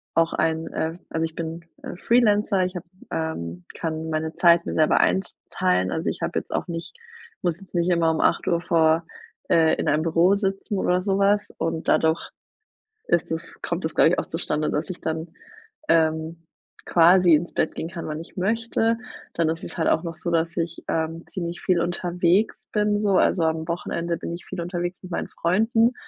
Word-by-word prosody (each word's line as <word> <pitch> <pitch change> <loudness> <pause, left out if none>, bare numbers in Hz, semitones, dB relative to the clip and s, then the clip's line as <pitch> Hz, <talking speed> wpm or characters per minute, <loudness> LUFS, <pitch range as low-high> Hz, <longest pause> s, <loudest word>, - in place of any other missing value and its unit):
auch 165 0 +3
ein 160 0 0
äh, 160 +1 -2
also 160 0 -1
ich 160 0 -7
bin, 165 0 -5 0.2
äh, - - -7
Freelancer, 210 -3 +3
ich 185 - -5
habe 175 - -6 0.3
ähm, 90 - -4
kann 160 -1 -3
meine 160 +1 -2
Zeit 170 -1 +5
mir - - -3
selber 155 -1 +4
einteilen, 95 - 0
also, - - -2
ich - - -5
habe - - 0
jetzt - - -14
auch - - -1
nicht 170 - -6 0.5
muss 175 -1 -1
jetzt 195 - -16
nicht 175 +1 +2
immer 165 -2 +3
um 160 - -1
8:00 170 -1 +2
vor 160 -1 +3 0.4
äh, 160 -1 +4
in - - -3
einem 155 +2 +2
Büro 170 +4 +4
sitzen 195 +1 -2
oder 180 0 +1
so 195 0 0
was 200 +1 +4 0.2
und 165 0 -2
dadurch 160 0 +2 0.8
ist - - +1
das - - -2 0.2
kommt - - -3
das, - - -4
glaube - - +6
ich, - - +1
auch - - -4
zustande, 150 0 -2
dass 150 - -2
ich 180 - -7
dann, 160 +1 -3 0.6
ähm, 160 0 +1 0.4
quasi 175 0 +6
ins 170 +3 -2
Bett - - 0
gehen 165 - -4
kann 170 -1 -6
wann 155 0 -4
ich - - -14
möchte. 225 +3 +1 0.4
Dann 165 -1 +1
ist 165 +1 -3
es - - -8
halt 160 - +1
auch 160 - +2
noch 165 -2 -5
so, 170 - -4
dass 165 0 0
ich, 165 -1 -3
ähm, 165 +1 -2
ziemlich 170 -2 -4
viel 175 -2 +2
unterwegs 175 +3 +1 0.2
bin 210 0 +1
so, 200 -3 +3
also, 170 - +3
am 160 0 0
Wochenende 170 0 -2
bin 170 - -5
ich 175 - -8
viel 185 - -7
unterwegs 175 +1 -3
mit 185 - -10
meinen - - -3
Freunden, 225 +7 +2
170 Hz, 195 wpm, -24 LUFS, 160-185 Hz, 0.8 s, glaube